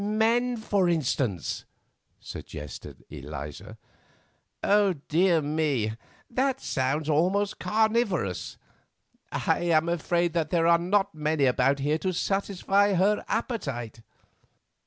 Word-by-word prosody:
"Men, 230 +4 +1
for 200 -4 +1
instance," 130 - -1 0.6
suggested 75 -1 -9
Eliza. 70 +2 -8 0.9
"Dear 180 -4 +2
me! 145 -7 0 0.4
that 265 +2 0
sounds 145 - -1
almost 185 +7 +1
carnivorous. 215 - 0 0.7
I - - 0
am 165 -2 +2
afraid 170 0 0
that 165 -3 0
there 165 -1 +2
are 170 0 +5
not 195 +3 +1
many 155 -2 +1
about 130 +2 +3
here 145 +3 0
to 185 +1 -1
satisfy 195 +2 +1
her 200 +4 +2
appetite. 135 - -3
170 Hz, 100 wpm, -27 LUFS, 145-205 Hz, 0.9 s, are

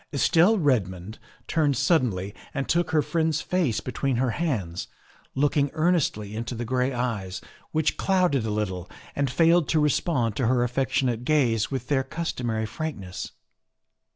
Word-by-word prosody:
Estelle 170 +8 +4
Redmond 110 - 0 0.3
turned 150 -5 +1
suddenly 105 - +1 0.2
and 135 -1 -2
took 170 +1 +1
her 155 -2 +2
friend's 160 -1 0
face 155 - 0
between 130 +1 -2
her 125 0 +1
hands, 110 - -2 0.5
looking 145 +1 +2
earnestly 155 - 0
into 120 +2 -4
the 120 +1 -4
gray 125 +2 0
eyes, 115 -7 -3 0.3
which 155 -1 +1
clouded 180 - +2
a 110 - -2
little 95 -4 -3 0.3
and 140 -1 0
failed 165 +3 +3
to 160 - +3
respond 145 - +1
to 125 - +1
her 125 0 +3
affectionate 125 -1 0
gaze 125 -7 +2
with 135 -2 -4
their 140 -3 +2
customary 120 -9 -3
frankness. 110 -7 -5
130 Hz, 145 wpm, -25 LUFS, 110-155 Hz, 0.5 s, Estelle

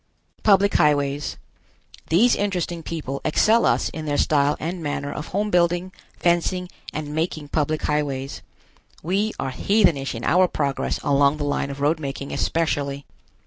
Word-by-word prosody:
PUBLIC 200 -1 +4
HIGHWAYS. 145 -2 +1 0.7
These 215 +10 +4
interesting 180 -4 -2
people 150 -5 -5
excel 220 +9 +3
us - - +2
in 155 -1 -6
their 145 -1 -1
style 145 0 +2
and 170 +2 -4
manner 145 -1 -3
of 150 - -6
home 205 +2 -1
building, 175 +1 +2 0.3
fencing 175 +1 +1 0.2
and 150 -1 -5
making 155 -2 -2
public 155 +1 -1
highways. 140 -2 -2 0.6
We 195 +6 0
are 130 - -3
heathenish 165 - +2
in 115 - -6
our 185 +1 +4
progress 140 -5 -1
along 140 +1 +3
the 150 - -3
line 145 -1 -1
of 140 0 -7
road 155 +3 +2
making 140 -1 -5
especially. 145 -4 -1
155 Hz, 145 wpm, -23 LUFS, 145-175 Hz, 0.7 s, PUBLIC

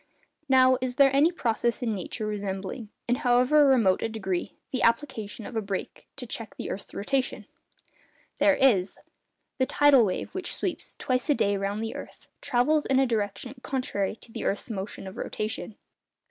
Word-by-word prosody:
Now, 260 -1 +5
is 255 -1 -2
there 275 0 +5
any 300 +5 +5
process 235 -5 -1
in 225 -2 0
nature 210 +3 -4
resembling, 205 +1 -4 0.2
in 245 +1 +2
however 260 +2 +4
remote 230 -9 +4
a - - -1
degree, 190 -5 -3 0.2
the 255 - -1
application 230 -4 0
of 245 - -8
a 220 - +1
brake 200 -2 -5
to 255 - -7
check 225 -2 -5
the - - -5
earth's 195 - -7
rotation? 265 +5 -1 0.9
There 295 0 +5
is. 205 -10 +3 0.6
The 260 - +2
tidal 285 -4 +5
wave, 185 -4 -2
which 370 -1 -3
sweeps, - - -4
twice 255 +3 -1
a 295 - +5
day, 200 -4 +1
round 200 +2 -2
the 225 - -4
earth, - - -10
travels 295 +5 +2
in 265 - +3
a 270 - +4
direction 215 +1 -2
contrary 230 -8 -2
to 230 - -15
the - - -5
earth's 205 +4 -2
motion 195 -1 -5
of 190 - -8
rotation. 215 0 -4
235 Hz, 175 wpm, -27 LUFS, 205-265 Hz, 0.9 s, Now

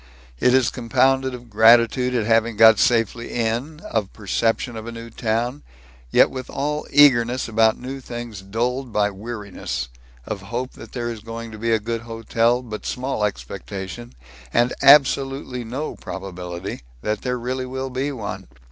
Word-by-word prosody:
It 125 - +4
is 130 -2 +3
compounded 130 +1 +1
of 120 0 -12
gratitude 115 +3 +5
at 115 -3 +1
having 115 0 +2
got 110 -1 +8
safely 115 0 +1
in; 120 +7 -2
of 105 -4 -2
perception 115 +3 -1
of 110 0 -7
a - - -5
new 115 0 -9
town, 120 +5 -1 0.5
yet - - +5
with 130 -1 -6
all 150 +2 -2
eagerness 125 -3 +5
about 110 -1 +3
new 135 +2 -6
things 120 -5 -7
dulled 120 +6 -2
by 105 -1 +1
weariness; 100 - -5 0.4
of 100 -3 -5
hope 120 +6 -4
that - - -13
there 120 -2 -2
is 115 - -7
going 115 +1 -7
to 110 - -9
be 115 +1 0
a 110 - +4
good 115 +2 -3
hotel, 115 +1 0
but 110 -3 -7
small 130 -3 -2
expectation 100 - -5 0.4
and 120 - +2
absolutely 135 -2 +4
no 130 +7 -4
probability 90 -1 -6 0.2
that 105 0 -1
there 125 -1 -1
really 130 +2 -3
will 130 +1 -4
be 135 +3 -1
one. 105 - -6
115 Hz, 160 wpm, -22 LUFS, 110-125 Hz, 0.5 s, got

